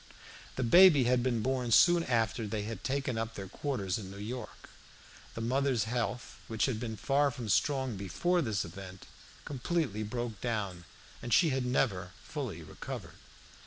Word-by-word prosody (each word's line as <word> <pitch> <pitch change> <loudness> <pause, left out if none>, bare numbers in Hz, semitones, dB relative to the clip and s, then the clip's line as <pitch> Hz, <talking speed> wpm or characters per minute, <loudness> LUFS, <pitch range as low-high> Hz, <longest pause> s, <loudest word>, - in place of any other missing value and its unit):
The 130 - -1
baby 170 +2 +7
had 125 0 +3
been 120 -3 0
born 130 -2 0
soon 175 +8 +6
after 115 -2 0
they 105 0 -2
had 110 +2 -6
taken 130 -3 -1
up 115 0 -4
their 95 -1 -6
quarters 100 -4 -2
in 95 -3 -8
New 100 - -9
York. 110 +2 -7 0.6
The 115 - -4
mother's 130 -1 +1
health, 120 +1 -3
which 110 -1 +1
had 125 -5 -1
been 110 -2 -4
far 140 +4 +2
from 125 -5 -6
strong 130 +1 +1
before 135 - 0
this 110 -8 -1
event, 95 +2 -10 0.4
completely 140 - -1
broke 115 0 -4
down, 100 -7 -3 0.4
and 120 - -6
she 165 +7 +5
had 130 -1 -1
never 95 -8 0
fully - - -5
recovered. - - -8
120 Hz, 165 wpm, -31 LUFS, 105-135 Hz, 0.6 s, baby